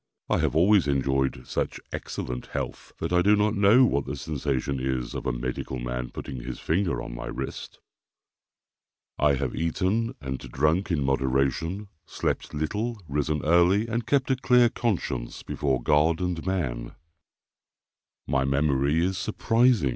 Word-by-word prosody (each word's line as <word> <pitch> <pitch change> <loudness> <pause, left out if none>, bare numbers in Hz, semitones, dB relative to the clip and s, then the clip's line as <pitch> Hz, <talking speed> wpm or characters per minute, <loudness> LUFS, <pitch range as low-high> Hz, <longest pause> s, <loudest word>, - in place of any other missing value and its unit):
I - - +3
have - - 0
always 95 +1 +5
enjoyed 65 -2 0
such - - -2
excellent 60 0 -5
health, - - -5
that 80 +2 -3
I 90 - +5
do 105 +3 +5
not 105 0 +2
know 105 +5 +6
what 70 - 0
the - - -3
sensation 70 -2 -2
is 65 -1 -2
of - - -4
a - - +2
medical 65 +1 -4
man 60 0 -4
putting 65 - -7
his 60 +1 -6
finger 85 -7 0
on - - -7
my - - -6
wrist. - - -6 1.4
I 75 -1 +4
have 65 -2 -2
eaten 100 +9 0
and 65 -2 -4
drunk 75 +8 0
in 80 -5 +1
moderation, 70 +8 0 0.2
slept - - -2
little, 105 +10 -2
risen 75 +1 -1
early, 85 +6 +4
and 115 0 -2
kept 135 0 +2
a - - +4
clear 125 -2 +4
conscience 85 - -2
before 65 -4 -1
God 80 +5 +3
and 90 -3 -2
man. 65 -11 -2 1.3
My 65 -1 +1
memory 70 +3 +2
is 95 0 -1
surprising. 115 - +2
75 Hz, 150 wpm, -26 LUFS, 65-100 Hz, 1.4 s, know